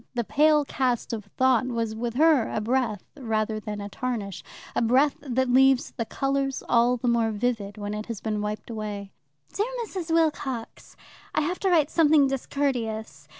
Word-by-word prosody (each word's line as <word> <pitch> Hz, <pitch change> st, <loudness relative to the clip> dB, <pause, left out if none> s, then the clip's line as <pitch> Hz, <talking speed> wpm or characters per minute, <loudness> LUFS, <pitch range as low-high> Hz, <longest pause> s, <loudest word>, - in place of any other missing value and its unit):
The 240 Hz, -, 0 dB
pale 300 Hz, +4 st, +3 dB
cast 250 Hz, -4 st, -1 dB
of 215 Hz, -3 st, -4 dB
thought 255 Hz, +3 st, +2 dB
was 230 Hz, -3 st, -2 dB
with 235 Hz, +1 st, -4 dB
her 300 Hz, -4 st, +4 dB
a -, -, -1 dB
breath 225 Hz, -2 st, 0 dB
rather 220 Hz, -5 st, -1 dB
than 210 Hz, 0 st, -6 dB
a 200 Hz, -, -5 dB
tarnish, 210 Hz, -3 st, -4 dB, 0.3 s
a -, -, +2 dB
breath 260 Hz, +5 st, +3 dB
that 260 Hz, -2 st, 0 dB
leaves 265 Hz, +1 st, +4 dB
the 230 Hz, -, -4 dB
colours 275 Hz, +2 st, -1 dB
all 240 Hz, +1 st, +3 dB
the 245 Hz, -, -3 dB
more 235 Hz, -1 st, +2 dB
vivid 215 Hz, -2 st, -2 dB
when 205 Hz, 0 st, -4 dB
it 210 Hz, 0 st, -5 dB
has 230 Hz, -4 st, -5 dB
been 215 Hz, -2 st, -2 dB
wiped 210 Hz, +2 st, -4 dB
away. 205 Hz, -3 st, -5 dB, 0.4 s
Dear 430 Hz, +5 st, -1 dB
Mrs. 360 Hz, -6 st, -5 dB
Wilcox, 295 Hz, -7 st, -1 dB, 0.4 s
I -, -, +3 dB
have 350 Hz, +5 st, -2 dB
to 390 Hz, -, +1 dB
write 315 Hz, -4 st, +3 dB
something 305 Hz, -3 st, +5 dB
discourteous. 230 Hz, -, -2 dB
245 Hz, 175 wpm, -26 LUFS, 215-275 Hz, 0.4 s, something